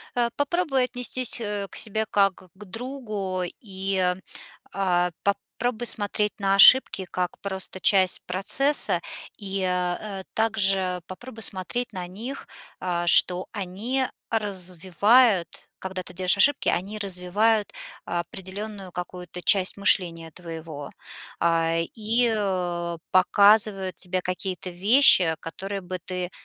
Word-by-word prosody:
Э, 240 -1 0
попробуй 285 -3 0
отнестись, 250 -1 0
э, 205 -2 -4
к - - -11
себе 220 +1 -1
как 195 -1 +2 0.2
к 210 +2 -13
другу. 215 -4 -5 0.2
И, 195 0 -2 0.8
а, 180 -2 0
попробуй 225 +4 -3
смотреть 210 0 0
на 195 -1 +1
ошибки 195 -1 +6
как 180 -1 -3
просто 190 -1 -6
часть 190 -2 +3
процесса, 260 +11 +2 0.4
и, 195 -2 -4
э, 185 +2 -3
также 195 -5 +2
попробуй 225 +4 -10
смотреть 200 +7 -3
на 180 -2 -6
них, 230 +10 -8 0.3
а, 175 -1 -3
что 180 +1 +7
они 215 +7 -3 0.2
развивают- 195 +1 +1
когда 190 0 -5
ты 180 - -10
делаешь 185 +1 +4
ошибки, 285 +6 +3
они 195 +4 -2
развивают 200 +3 0 0.3
определенную 190 +3 -6
какую-то 180 0 -8
часть 190 +1 +3
мышления 170 -5 +3
твоего. 160 -3 -9 0.5
А, 165 0 +1 0.2
и 230 +2 +1 0.8
показывают 200 0 +3
тебе 185 0 -3
какие-то 185 0 -5
вещи, 185 -3 +5
которые 195 +4 -6
бы 185 0 -6
ты 180 -1 -4
195 Hz, 115 wpm, -24 LUFS, 180-220 Hz, 0.8 s, что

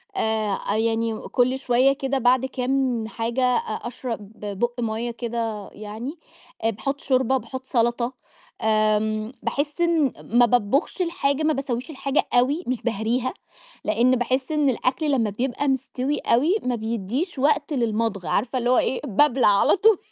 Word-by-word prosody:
آآ، 220 - 0
أ 200 - -2
يعني 225 0 0
كُلّ 255 +2 +1
شوية 260 +1 +3
كده 270 -1 -1
بعد 255 +1 +3
كام 255 -3 -1
حاجة 230 +3 -2
أ 250 -1 +3 0.3
أشرب 230 -4 -6
بُق 210 +4 -3
مَيّة 230 +1 -2
كده 230 -3 -4
يعني، 220 +9 -7 0.4
آآ، 225 - +3
باحُط 275 +6 -3
شوربة، 260 0 +2
باحُط 260 0 -7
سلطة، 240 0 0 0.5
آآ، 215 0 +1
باحس 290 +4 -2
إن 325 -6 +2 0.2
ما 245 - +8
باطبخش 245 - +1
الحاجة، 310 -4 0
ما 310 0 +3
باسوّيش 260 -1 -3
الحاجة 275 -1 -1
أوي، 270 +8 +3
مش 255 -2 -1
باهريها، 235 +2 -1 0.5
لإن 250 +3 +3
باحس 260 +4 -1
إن 300 -2 +2
الأكل 260 +4 0
لمّا 230 -6 +2
بيبقى 255 +6 -2
مستوي 265 +1 -1
أوي 295 - +2
ما 250 -1 0
بيدّيش 235 - -3
وقت 295 +2 +2
للمضغ، 225 - -1
عارفة 250 - 0
اللي 245 - 0
هو 250 - +4
إيه؟ 260 - +1
بابلع 255 +2 +3
على 200 -1 +4
طول. 430 +1 +5
245 Hz, 150 wpm, -24 LUFS, 225-275 Hz, 0.5 s, ما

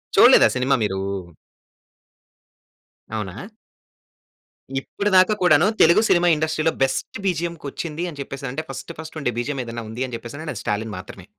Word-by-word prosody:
చూడలేదా - - +8
సినిమా 130 +2 +2
మీరు? 95 -2 -1 2.2
అవునా! 105 -1 -5 1.4
ఇప్పటి 200 +9 -3
దాకా 185 +3 +5
కూడాను 160 -1 +5
తెలుగు 170 +5 +6
సినిమా 175 0 +4
ఇండస్ట్రీలో 155 +1 0
బెస్ట్ 135 +10 -2
బిజిఎమ్‌కొచ్చింది 170 -2 -3
అని 145 - -12
చెప్పేసి 135 0 -6
అంటే 155 +5 -4
ఫస్ట్ 135 +5 -7
ఫస్ట్ 160 0 -8
ఉండే 125 -3 -1
బిజిఎమ్ 135 +2 -2
ఏదైనా 115 -1 -6
ఉంది 115 +4 -3
అని 125 - -10
చెప్పేసి 120 +4 -9
ఆనంటే 155 0 -5
అది - - -6
'స్టాలిన్' 105 0 -2
మాత్రమే. 90 - -10
145 Hz, 140 wpm, -22 LUFS, 120-165 Hz, 2.2 s, చూడలేదా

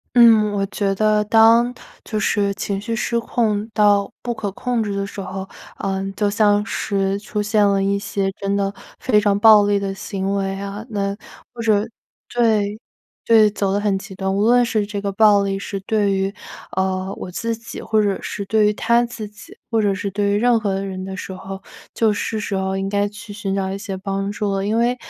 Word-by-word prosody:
嗯， 225 -3 +6
我 200 -1 0
觉 195 -1 -1
得 215 +1 +2
当 230 +3 +5 0.3
就 215 - -3
是 200 -1 +1
情 195 0 -3
绪 230 +2 -3
失 235 0 0
控 220 -2 -1
到 205 -1 +3
不 240 - -2
可 205 -3 -3
控 240 +2 -1
制 200 -2 -3
的 200 0 -2
时 200 - -8
候， 190 0 -5 0.3
呃， 195 -1 -2
就 205 -1 +1
像 205 -1 +3
是 195 -3 -1
出 210 0 -3
现 210 0 +2
了 195 -1 +2
一 200 0 +1
些 195 -1 -2
真 200 0 0
的 200 0 0 0.3
非 210 -5 +3
常 205 -1 +2
暴 215 -1 +7
力 205 0 +2
的 195 -1 -3
行 195 -1 -3
为 195 0 -2
啊， 200 +2 -6
那 200 -3 -2 0.4
或 240 - -9
者 215 -2 +2 0.5
对 215 -3 +1 0.5
对， 220 -2 +6
走 200 -1 -1
得 200 - +1
很 205 -2 0
极 195 0 -10
端， 190 0 -2
无 200 - 0
论 245 +1 +5
是 215 -3 0
这 205 -1 -5
个 200 -1 -2
暴 205 -1 +5
力 195 0 -1
是 200 0 -5
对 205 0 +1
于， 195 +1 -1 0.4
呃， 190 0 -1
我 180 - -6
自 230 +5 -2
己 230 +1 -9
或 220 -1 +1
者 200 -2 0
是 200 - -4
对 220 0 +3
于 210 - +3
他 235 +3 +2
自 230 -3 -6
己， 210 0 -14 0.2
或 225 -1 +2
者 200 -1 +2
是 200 0 -3
对 200 +1 0
于 205 - +2
任 240 +1 +3
何 195 -3 -1
人 190 -1 -5
的 190 - -6
时 190 - -7
候， 190 +1 -8 0.3
就 225 -2 +2
是 215 +1 -2
时 205 - -3
候 190 0 -1
应 195 0 -2
该 205 0 +1
去 210 +1 -11
寻 195 -2 -3
找 190 -1 -1
一 195 - -3
些 200 -1 -5
帮 195 +1 -3
助 205 -1 -2
了。 195 - -1
因 220 +2 +1
为， 240 +2 +2
205 Hz, 230 characters per minute, -20 LUFS, 195-220 Hz, 0.5 s, 暴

